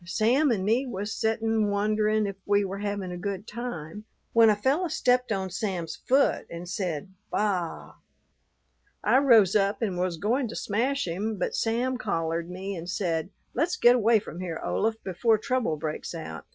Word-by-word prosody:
Sam 235 Hz, -, +2 dB
and 200 Hz, -6 st, 0 dB
me 240 Hz, +6 st, +2 dB
was 205 Hz, -2 st, -4 dB
settin' 220 Hz, -1 st, +1 dB
wonderin' 215 Hz, +1 st, +1 dB
if 200 Hz, -1 st, -4 dB
we 205 Hz, 0 st, +3 dB
were 195 Hz, +1 st, -5 dB
havin' 200 Hz, -3 st, -3 dB
a 175 Hz, -, -6 dB
good 200 Hz, +1 st, -4 dB
time, 210 Hz, -5 st, -6 dB, 0.3 s
when 230 Hz, -1 st, +7 dB
a 210 Hz, -, +4 dB
fellow 275 Hz, -, +1 dB
stepped 250 Hz, -5 st, +1 dB
on 190 Hz, -3 st, -1 dB
Sam's 180 Hz, -4 st, -3 dB
foot 270 Hz, +2 st, +2 dB
and 170 Hz, +1 st, -7 dB
said 185 Hz, -2 st, -3 dB, 0.2 s
baa. 190 Hz, -5 st, -2 dB, 1.1 s
I 230 Hz, +5 st, +4 dB
rose 225 Hz, -9 st, +5 dB
up 200 Hz, +2 st, +2 dB
and 190 Hz, -5 st, -1 dB
was 180 Hz, -2 st, -1 dB
goin' 240 Hz, -, 0 dB
to 225 Hz, -, -7 dB
smash 250 Hz, +4 st, -1 dB
him, 205 Hz, +6 st, -2 dB
but -, -, -2 dB
Sam 245 Hz, +3 st, 0 dB
collared 165 Hz, -4 st, -2 dB
me 190 Hz, +2 st, -5 dB
and 170 Hz, 0 st, -7 dB
said, 170 Hz, -3 st, -1 dB, 0.2 s
'Let's 335 Hz, +7 st, 0 dB
get 240 Hz, -8 st, +6 dB
away 230 Hz, -1 st, +4 dB
from 195 Hz, -4 st, -6 dB
here, 175 Hz, -3 st, -4 dB
Olaf, 220 Hz, +1 st, 0 dB
before 215 Hz, +4 st, +2 dB
trouble 245 Hz, -, -1 dB
breaks 155 Hz, +2 st, -4 dB
out.' 80 Hz, -, -7 dB
205 Hz, 175 wpm, -27 LUFS, 180-230 Hz, 1.1 s, when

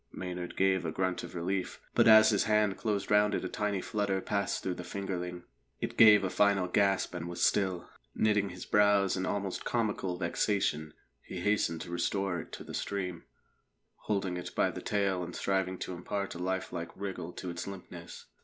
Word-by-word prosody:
Maynard 90 Hz, -1 st, -6 dB
gave 95 Hz, -1 st, +3 dB
a 80 Hz, -, -2 dB
grunt 95 Hz, +1 st, -1 dB
of -, -, -9 dB
relief, 95 Hz, +2 st, -2 dB
but -, -, +4 dB
as 110 Hz, 0 st, +8 dB
his 105 Hz, -, +2 dB
hand 105 Hz, -2 st, +2 dB
closed 105 Hz, -3 st, -2 dB
round 105 Hz, 0 st, +4 dB
it -, -, -2 dB
a -, -, 0 dB
tiny 100 Hz, 0 st, -1 dB
flutter 100 Hz, -3 st, -1 dB
passed 100 Hz, 0 st, -1 dB
through 95 Hz, -, -1 dB
the 90 Hz, -, -7 dB
fingerling; 90 Hz, -2 st, -4 dB, 0.4 s
it -, -, -4 dB
gave 105 Hz, -2 st, +8 dB
a 95 Hz, -, 0 dB
final 100 Hz, -3 st, +3 dB
gasp 95 Hz, 0 st, +2 dB
and 85 Hz, -1 st, -4 dB
was 85 Hz, 0 st, -3 dB
still. 95 Hz, -3 st, +1 dB, 0.3 s
Knitting 105 Hz, -2 st, +2 dB
his 90 Hz, 0 st, -8 dB
brows 100 Hz, -2 st, +4 dB
in 95 Hz, 0 st, -2 dB
almost 100 Hz, -2 st, -2 dB
comical 105 Hz, -6 st, -1 dB
vexation, 85 Hz, -3 st, 0 dB, 0.3 s
he 90 Hz, -, -7 dB
hastened 95 Hz, -5 st, +1 dB
to 85 Hz, -, -7 dB
restore 85 Hz, +1 st, -1 dB
it -, -, -9 dB
to -, -, -7 dB
the -, -, -9 dB
stream, 90 Hz, -4 st, -3 dB, 0.8 s
holding 95 Hz, -4 st, 0 dB
it 90 Hz, -, -7 dB
by -, -, +2 dB
the -, -, -7 dB
tail 100 Hz, -3 st, 0 dB
and 85 Hz, 0 st, -7 dB
striving 95 Hz, -1 st, 0 dB
to 90 Hz, -, -5 dB
impart 100 Hz, +3 st, -4 dB
a 85 Hz, -, -8 dB
life 95 Hz, +1 st, -2 dB
like 85 Hz, -1 st, -4 dB
wriggle 95 Hz, -3 st, -5 dB
to 90 Hz, -, -5 dB
its 85 Hz, -, -6 dB
limpness. 90 Hz, -3 st, -9 dB
95 Hz, 190 wpm, -31 LUFS, 90-100 Hz, 0.8 s, as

